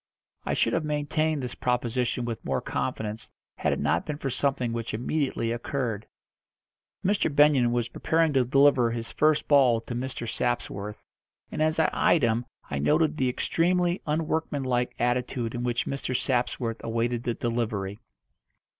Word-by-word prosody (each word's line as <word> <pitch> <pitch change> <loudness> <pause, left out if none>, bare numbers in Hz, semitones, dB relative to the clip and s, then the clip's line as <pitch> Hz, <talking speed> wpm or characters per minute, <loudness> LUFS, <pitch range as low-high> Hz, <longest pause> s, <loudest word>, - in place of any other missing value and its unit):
I - - 0
should - - +2
have 165 - +1
maintained 150 0 0
this 125 -1 -4
proposition 125 0 -1
with 115 -2 -4
more - - 0
confidence 110 +1 -3 0.3
had - - +1
it - - 0
not - - +1
been 150 - -4
for 135 -3 -3
something 130 -3 0
which 115 -2 -3
immediately 125 -1 -1
occurred. 120 -2 -3 1.0
Mr. 200 -3 +2
Benyon 140 -4 +5
was 120 -1 0
preparing 160 +5 +1
to 130 -2 +4
deliver 135 -1 +4
his 115 0 -4
first 155 -1 +2
ball 130 -5 +5
to 120 - -7
Mr. 120 -1 -4
Sapsworth, 110 -3 -3 0.5
and - - -3
as 155 +1 +2
I 160 - +4
eyed 160 - +3
him 115 +1 +1 0.2
I 70 - -3
noted 155 - +2
the 130 -3 +2
extremely 175 +6 +1
unworkmanlike 145 -5 -1
attitude 120 -1 -1
in 120 - -3
which 120 0 0
Mr. 135 -2 -2
Sapsworth 120 -2 -1
awaited 115 +1 -1
the 120 -1 -2
delivery. 110 -4 -2
125 Hz, 155 wpm, -27 LUFS, 115-150 Hz, 1.0 s, Benyon